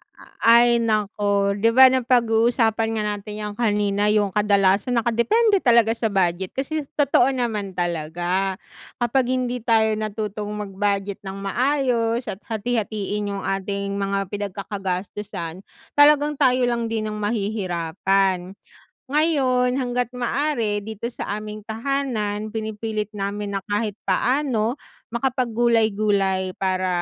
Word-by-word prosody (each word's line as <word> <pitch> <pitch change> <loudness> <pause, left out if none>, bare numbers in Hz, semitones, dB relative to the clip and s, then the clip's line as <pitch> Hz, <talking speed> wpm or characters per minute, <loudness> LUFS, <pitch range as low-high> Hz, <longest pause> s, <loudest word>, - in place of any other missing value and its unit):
A - - -16 0.3
ay, 240 0 +5
naku, 205 -2 +1
'di 225 - +4
ba, 260 0 +9
napaguusapan 230 -2 +2
nga 215 - -1
natin 210 +1 -8
yang 210 0 -4
kanina, 205 -2 +1
yung 210 -2 +2
kadalasan 205 +2 +2
nakadepende 385 - +2
talaga 235 -2 +4
sa 230 -1 -1
budget. 185 -1 0
Kasi 285 +2 -2
totoo 275 -3 +4
naman 220 -7 -2
talaga 175 +3 -1 0.4
kapag 245 +2 +1
hindi 250 -1 -2
tayo 220 -2 +3
natutong 215 -1 -4
mag-budget 200 -1 -2
ng 195 0 -7
maayos 240 +2 0
at 200 -5 -5
hati-hatiin 210 -2 -2
yung 195 - -5
ating 200 +1 -2
mga 195 0 -1
pinagkakagastusan, 195 -2 -5 0.3
talagang 295 0 +5
tayo 255 -3 +2
lang 235 -1 -1
din 215 -1 -2
ang 210 - -5
mahihirapan. 195 -2 -1 0.5
Ngayon, 265 -5 +2
hangga't 250 -1 -2
maaari 240 -4 0
dito 220 +3 -6
sa - - -6
aming 210 0 -8
tahanan 220 -3 -2
pinipilit 215 -1 -4
namin 205 0 -4
na 195 - -1
kahit 210 +1 -1 0.2
paano 250 -2 +1 0.3
makapag 250 0 -1
gulay-gulay, 205 -5 +1
para 185 -1 -1
215 Hz, 120 wpm, -22 LUFS, 200-240 Hz, 0.5 s, ba